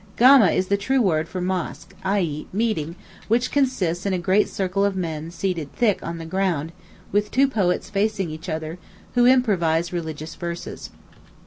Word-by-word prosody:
Gama 255 -3 +8
is 185 - 0
the 200 - +3
true 260 +7 +1
word 165 -8 +2
for 185 +1 -5
Mosque—i.e., 180 -2 -2
Meeting, 195 -7 -1 0.3
which 240 +3 +1
consists 200 -12 0
in 200 - 0
a - - +1
great 185 +4 +2
circle 195 +1 -1
of 200 -1 +1
men 165 -3 -3
seated 170 -4 -3
thick 220 -5 +1
on 170 0 -5
the 165 - -7
ground, 165 -3 -1 0.4
with 205 +1 +1
two 275 +1 +3
poets 200 -6 0
facing 200 -4 0
each 160 +4 -7
other, 160 +2 -4 0.3
who 245 0 +5
improvise 175 -10 +2
religious 160 -2 -5
verses. 170 -1 -6
185 Hz, 160 wpm, -23 LUFS, 165-210 Hz, 0.4 s, Gama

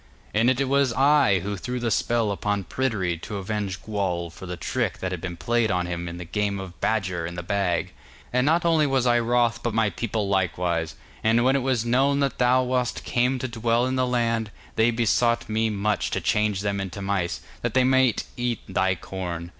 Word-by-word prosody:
And 115 +4 +3
it 130 +1 +1
was 140 -1 +3
I 135 - +4
who 100 +2 -3
threw 125 +6 -4
the 120 -1 -1
spell 115 0 +1
upon 100 0 -1
Pryderi 95 -6 -1
to 100 +4 -6
avenge 100 -2 -3
Gwawl 90 -5 -2
for 90 +3 -10
the 90 0 -5
trick 115 +1 -2
that 95 - -3
had 90 -3 -4
been 90 -2 -5
played 115 +7 +1
on 90 -2 0
him 85 0 -4
in 85 - -7
the 90 - -7
game 100 +2 -1
of 90 -3 -9
Badger 95 -6 0
in 85 - -7
the 85 - -5
Bag. 95 -2 0 0.4
And 125 0 +3
not 165 +4 +2
only 160 -3 +4
was 135 -2 +1
I 120 -1 +4
wroth, 120 0 +1
but 120 -3 -2
my 110 -2 +2
people 110 -3 -2
likewise, 90 -4 0 0.3
and 115 +2 +3
when 135 +1 +4
it - - +3
was 125 -3 0
known 135 +4 +2
that 140 -1 -1
thou 125 +1 +4
wast 125 -1 -1
come 125 +2 +1
to 130 - -3
dwell 115 0 +1
in 130 0 -1
the 130 -1 +1
land, 115 -3 0 0.3
they 110 +1 +4
besought 120 +1 +1
me 110 +1 +1
much 105 0 0
to - - -1
change 105 -2 +1
them 100 -1 -1
into 95 +1 -6
mice, 95 -3 -1 0.2
that - - -2
they 130 - +5
might 130 -2 +3
eat 120 -2 -2
thy 95 0 +1
corn. 85 -2 -5
110 Hz, 210 wpm, -25 LUFS, 95-125 Hz, 0.4 s, they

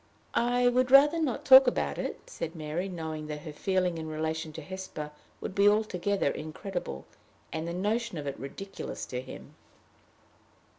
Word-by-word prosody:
"I 245 +1 +3
would 250 +1 +3
rather 295 +5 +7
not 275 -7 -1
talk 265 0 +10
more - - +8
about - - -2
it," - - -4
said 165 - -6
Mary, 160 +4 -3
knowing 160 -3 -5
that 150 -1 -5
her 155 - -7
feeling 180 0 0
in 160 - -5
relation 160 0 -3
to 160 - -7
Hesper 185 -4 -6 0.3
would - - -5
be 200 +1 +6
altogether 200 -5 +1
incredible, 155 - -5 0.5
and 160 +1 -3
the 170 - -3
notion 215 +2 -1
of 150 - -5
it 140 - -4
ridiculous 195 +9 -6
to 125 0 -4
him. - - -11
180 Hz, 165 wpm, -29 LUFS, 155-215 Hz, 0.5 s, talk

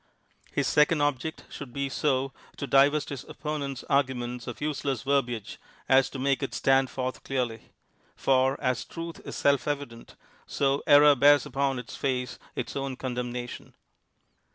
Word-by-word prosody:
Ifis - - +2
second 150 +1 +3
object 145 +2 -1
should 140 -4 -9
be 140 +2 -2
so 135 -1 0 0.2
to - - -3
divest 140 +2 +4
his 140 -3 -6
oppo 150 -1 -4
nent's 140 -2 -5
argument 125 -4 0
of 120 - -6
useless 140 -5 -2
verbiage 125 -6 -1 0.3
as 130 0 +5
to - - -7
make 135 +1 +1
it 135 - -3
stand 135 -1 +3
forth 130 -1 -4
clearly; 125 -4 -3 0.5
for 130 +1 +2
as 130 -3 0
truth 165 0 -7
is - - -6
self 140 -1 +2
evident, 140 -5 -5 0.3
so 140 0 +1
error 145 0 +8
bears 145 +1 +5
upon 135 0 -1
its 120 -4 -7
face 125 -2 -2 0.2
its - - -4
own 135 -2 -3
condemna 125 -1 -3
tion. - - -11
135 Hz, 155 wpm, -27 LUFS, 125-145 Hz, 0.5 s, error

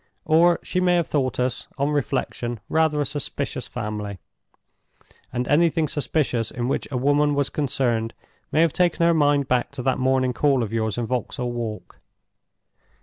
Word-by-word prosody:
Or 170 +2 +4
she 180 - -1
may 180 -1 +3
have 170 -2 +2
thought 130 -5 -1
us, 125 0 -1
on 140 +1 0
reflection, 120 -4 -2
rather 160 -2 +2
a 145 - +1
suspicious 140 -2 -3
family; 105 -3 -5 1.1
and 125 0 -2
anything 160 +1 +3
suspicious 140 -5 0
in 120 -1 -3
which 135 - -1
a 135 - -2
woman 145 +3 +2
was 140 -1 0
concerned 120 -5 -1 0.4
may 155 +2 +3
have 165 -3 +3
taken 175 -2 +2
her 170 - +5
mind 145 -3 +3
back 125 -2 +1
to 125 - -5
that 130 0 +1
morning 130 -1 +2
call 135 -2 +2
of 110 0 -5
yours 110 -1 -1
in 120 - -1
Vauxhall 125 +1 -2
Walk. 115 -3 -6
135 Hz, 165 wpm, -23 LUFS, 120-150 Hz, 1.1 s, her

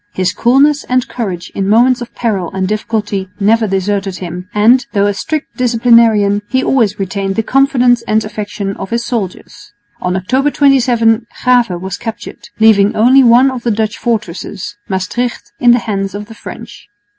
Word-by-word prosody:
His 185 -1 0
coolness 280 +4 +3
and 255 0 0
courage 195 -7 -5
in 195 0 -2
moments 245 +3 +3
of 240 - -8
peril 200 -7 -2
and 190 -1 -1
difficulty 210 -2 -3
never 220 +2 +2
deserted 195 0 -2
him, 180 +1 -7
and, 235 +5 +4
though 200 -1 +2
a 205 - +1
strict 310 +9 -4
disciplinarian, 230 -4 +3
he 260 0 0
always 220 -6 +1
retained 195 0 -3
the 225 - 0
confidence 250 -2 +2
and 215 0 +1
affection 205 -2 -5
of 190 - -6
his 235 0 -2
soldiers. 210 -4 -6 0.3
On 180 0 -1
October 260 +10 0
27 240 -5 +2 0.2
Grave 245 -2 +3
was 190 0 -5
captured, 225 -2 -8
leaving 210 -2 +4
only 255 +5 +5
one 250 +3 +5
of 255 -2 -6
the 235 - -1
Dutch 215 0 -1
fortresses, 210 -2 -4
Maestricht, 200 +6 -3
in 245 - +3
the 240 - +6
hands 195 -2 -3
of 205 +1 -6
the 225 - -12
French. 230 +1 -11
220 Hz, 170 wpm, -14 LUFS, 200-245 Hz, 0.3 s, the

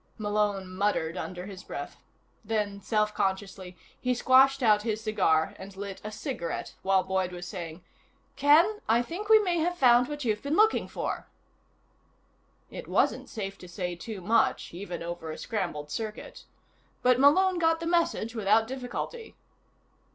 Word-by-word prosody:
Malone 205 -2 0
muttered 185 -3 -1
under 180 -1 -5
his 195 -1 -9
breath. - - -7 0.5
Then, 210 -2 -2
self 210 0 0
consciously, 190 -2 -3 0.2
he 250 0 0
squashed 265 +2 +5
out 210 -2 +5
his 215 -1 -2
cigar 185 -8 +2
and 195 0 -10
lit 200 -1 -6
a 215 - -5
cigarette 210 - -4
while 190 -1 +3
Boyd 190 -1 -1
was 175 0 -7
saying: 175 -3 -7 0.5
"Ken, 325 +10 +4
I 235 +2 +4
think 375 - -6
we 440 - +9
may 360 -5 +1
have 350 +2 0
found 245 -3 +5
what 295 -2 -5
you've 210 -2 0
been 285 +2 -1
looking 435 +3 +3
for." - - -4 1.4
It - - -8
wasn't - - +1
safe 195 -3 -5
to 180 - -11
say 180 0 -4
too 200 +2 -7
much, 215 -1 +1
even 175 -2 -6
over 170 -1 -6
a 155 - -5
scrambled 170 -9 -4
circuit. 215 +2 -6 0.6
But 250 0 +4
Malone 360 +6 +5
got 325 -1 +2
the 330 - -5
message 330 -9 0
without 220 0 +3
difficulty. 265 - -6
210 Hz, 155 wpm, -28 LUFS, 190-270 Hz, 1.4 s, we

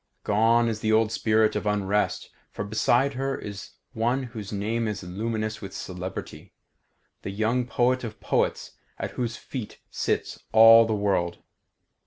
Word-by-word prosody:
Gone 115 +3 +3
is 110 -2 -2
the 110 0 0
old 110 0 +3
spirit 110 -1 +2
of 105 0 -2
unrest, 105 0 0 0.2
for - - -5
beside 120 +6 +2
her 135 +1 -2
is 100 -2 -8 0.2
one 120 +4 0
whose 110 -5 -7
name 110 +3 -1
is 105 -2 -4
luminous 110 +4 -3
with 100 -2 -8
celebrity; 90 -2 -7 0.7
the - - -5
young 110 +5 0
poet 125 +2 +1
of 110 -3 -7
poets - - -1 0.3
at - - -4
whose 120 -2 -3
feet 125 -6 -7
sits - - -2
all 115 0 +8
the 110 - 0
world. 95 -4 -1
110 Hz, 150 wpm, -26 LUFS, 100-115 Hz, 0.7 s, all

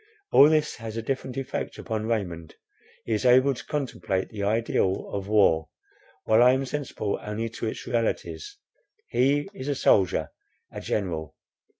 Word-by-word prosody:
All 145 - +8
this 155 -1 +1
has 115 -1 -7
a 115 - -3
different 130 +1 -3
effect 135 -1 -4
upon 110 -2 -3
Raymond. 90 -8 -3 0.5
He 115 - -1
is 105 - 0
able 130 +2 +5
to 120 -2 -9
contemplate 120 -10 -2
the 105 - -6
ideal 100 -2 0
of 100 -1 -3
war, 95 -7 +3 0.5
while 110 +1 +4
I 125 +1 +7
am 135 +1 0
sensible 130 -7 -3
only 110 +2 -3
to 115 0 -5
its - - -5
realities. 125 - -2 0.5
He 140 +5 +2
is 140 -8 -7
a 145 - 0
soldier, 95 - +2 0.4
a - - -7
general. 80 -7 -3
115 Hz, 160 wpm, -26 LUFS, 100-130 Hz, 0.5 s, All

